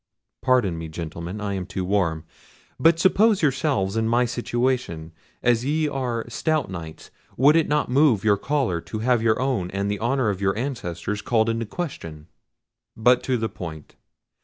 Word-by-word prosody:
—pardon 120 -10 +2
me, 80 - -5
gentlemen, 85 +4 -6
I 105 -1 -3
am 95 -2 -4
too 95 - -3
warm: 85 -5 0 0.5
but 165 0 +5
suppose 195 +2 +3
yourselves 130 -9 +1
in 110 0 +1
my 120 +2 +3
situation: 120 -8 -2 0.3
as 120 -1 +3
ye 155 +3 +1
are 125 -5 -2
stout 155 - -1
Knights, 80 -3 -8 0.3
would 145 +5 +5
it 165 -2 +3
not 150 0 +1
move 130 -5 +3
your 105 -2 +4
choler 125 - -1
to 110 - -6
have 125 -3 +3
your 110 -1 +2
own 125 -9 -1
and 100 +1 -2
the 105 - -3
honour 120 -1 +1
of 95 -1 -6
your 95 0 +1
ancestors 105 -6 -3
called 115 -1 +1
in 115 0 -1
question?" 85 - -6 0.7
"But 120 +3 +4
to 130 -1 +1
the 110 -1 -1
point. 80 -7 -9
115 Hz, 170 wpm, -24 LUFS, 95-130 Hz, 0.7 s, but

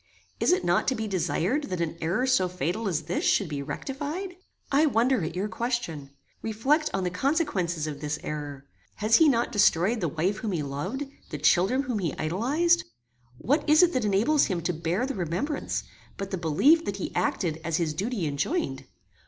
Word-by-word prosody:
"Is - - +3
it 365 - +2
not 175 +1 +2
to 265 - +2
be 220 -1 -3
desired 190 - 0
that 185 -2 -4
an 165 -1 -2
error 180 +11 0
so 190 -9 +2
fatal 180 +5 -2
as 160 -4 -1
this 170 +4 -2
should 200 - +3
be 145 -2 -4
rectified?" 290 - -5 0.4
"I 295 +3 +4
wonder 245 - +2
at 160 - -4
your 190 +3 -1
question. 200 - -3 0.3
Reflect 270 +9 +1
on 195 - -1
the 180 - -1
consequences 185 - 0
of 145 -2 -5
this 150 0 -2
error. 145 -2 -5 0.3
Has 215 +2 +4
he 320 -2 +6
not 235 -3 +1
destroyed 205 +2 +3
the 170 - +1
wife 175 +7 -1
whom 210 -1 -3
he 160 -4 -1
loved, 170 - -3 0.3
the - - -4
children 230 +10 +3
whom 245 -5 -2
he 170 -6 -2
idolized? 275 - +2 0.5
What 295 - 0
is 310 +4 +7
it 350 - +3
that 255 -3 0
enables 215 +9 +3
him 180 -4 -2
to 175 +2 -1
bear 170 +8 -1
the 275 - -3
remembrance, 190 - -2 0.3
but 195 0 -5
the - - 0
belief 260 - +4
that 200 - -3
he 190 - -5
acted 170 -2 -1
as 165 -2 0
his 160 -3 -1
duty 200 +2 -2
enjoined? 155 - -2
195 Hz, 195 wpm, -27 LUFS, 165-260 Hz, 0.5 s, is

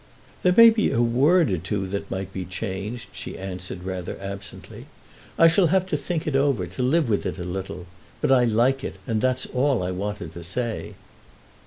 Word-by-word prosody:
"There 180 0 +3
may 230 0 +10
be 220 -1 +1
a - - 0
word 135 - +4
or 90 - 0
two 95 +3 -2
that 100 +1 -4
might 95 0 -4
be 95 - -3
changed," 100 +5 -5
she - - -7
answered, 90 -1 -6
rather 95 -2 -5
absently. 100 0 -8 0.5
"I 165 - +6
shall 170 +2 +4
have 185 +3 +2
to 185 - -2
think 160 +2 -2
it 150 - -1
over, 135 -8 +2
to 90 +7 -6
live 145 +4 +2
with 105 -3 +1
it - - -4
a 90 - -5
little. 90 0 -5 0.3
But - - +1
I 125 -2 +5
like 120 +4 +2
it, - - -4
and 110 -4 -1
that's 130 0 +1
all 130 -4 +1
I 90 - -2
wanted 95 -3 -4
to 85 - -8
say." 115 +6 -3
115 Hz, 200 wpm, -24 LUFS, 95-135 Hz, 0.5 s, may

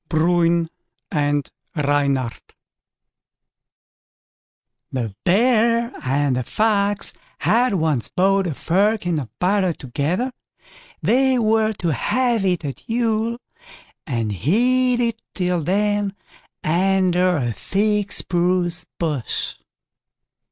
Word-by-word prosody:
BRUIN 170 +1 +2 0.4
AND 145 -1 0 0.2
REYNARD 140 -5 -1 2.4
The 120 -6 -3
Bear 235 +4 +3
and 135 0 +1
the - - 0
Fox 205 - 0 0.2
had 245 -1 +2
once 155 -8 0
bought 195 +1 +2
a 155 - -3
firkin 185 -1 +1
of 130 -6 -6
butter 185 -1 +2
together; 155 - -2 0.7
they 260 +1 +3
were 220 -1 +2
to 170 -6 -1
have 240 - +1
it 180 -4 0
at 140 - -5
Yule 230 0 0 0.7
and 115 -6 -1
hid 245 - +2
it 230 -1 -1
till 180 -2 0
then 205 +3 0 0.5
under 185 +1 +2
a 120 -4 -1
thick 205 - 0
spruce 175 -1 0
bush. 150 -8 -2
185 Hz, 95 wpm, -21 LUFS, 155-220 Hz, 2.4 s, Bear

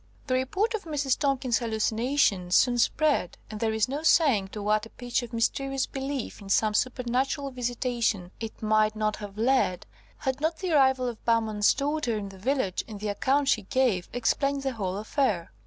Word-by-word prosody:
The 255 - -1
report 375 - 0
of 430 -4 -4
Mrs. 290 -4 0
Tomkins's 270 -4 +1
hallucination 220 -3 +1
soon 245 +6 +3
spread, 295 - +1
and 215 - -6
there 225 0 +1
is 220 +1 +1
no 280 +4 -3
saying 280 - +4
to 205 +1 -7
what 215 +1 +1
a - - -22
pitch 245 +1 -2
of 240 -1 -8
mysterious 270 +3 0
belief 270 -4 -5
in 195 - -10
some 215 +2 +3
supernatural 255 +4 -1
visitation 240 -6 -1
it 225 -1 -7
might 215 0 +2
not 215 -1 -1
have 205 -1 -9
led, 230 -6 +1 0.3
had 265 +1 -3
not 320 +1 0
the 370 -2 -3
arrival 265 -4 +3
of 235 -3 -6
Bowman's 220 -3 +2
daughter 285 -5 -1
in 200 -1 -5
the 190 -1 -13
village, 245 -4 -1
and 210 -2 -8
the 210 0 -3
account 270 +7 +1
she 220 - +3
gave, 210 -4 0
explained 275 +3 0
the 270 -1 -1
whole 195 -4 -3
affair. 210 - -1
240 Hz, 185 wpm, -27 LUFS, 215-270 Hz, 0.3 s, saying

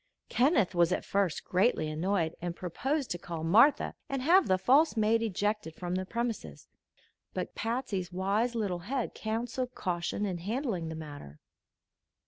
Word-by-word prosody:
Kenneth 245 - +3
was 175 0 +3
at - - -1
first 195 -4 0
greatly 185 -4 +2
annoyed, 165 +1 0
and 175 -1 -3
proposed 265 - -2
to 175 - -2
call 165 -2 -6
Martha 225 - +5 0.2
and 270 -2 -2
have 360 +6 +5
the 185 - +3
false 275 - +4
maid 220 +1 +3
ejected 205 -5 -1
from 175 0 -4
the 185 0 -2
premises; 235 0 -4 0.7
but - - -3
Patsy's 225 -6 -2
wise 200 +6 0
little 200 -6 -1
head 240 +7 -3
counselled 240 +3 -3
caution 180 +2 -2
in 185 -3 -3
handling 205 - -2
the 160 - -5
matter. 145 - -9
200 Hz, 150 wpm, -30 LUFS, 175-240 Hz, 0.7 s, Martha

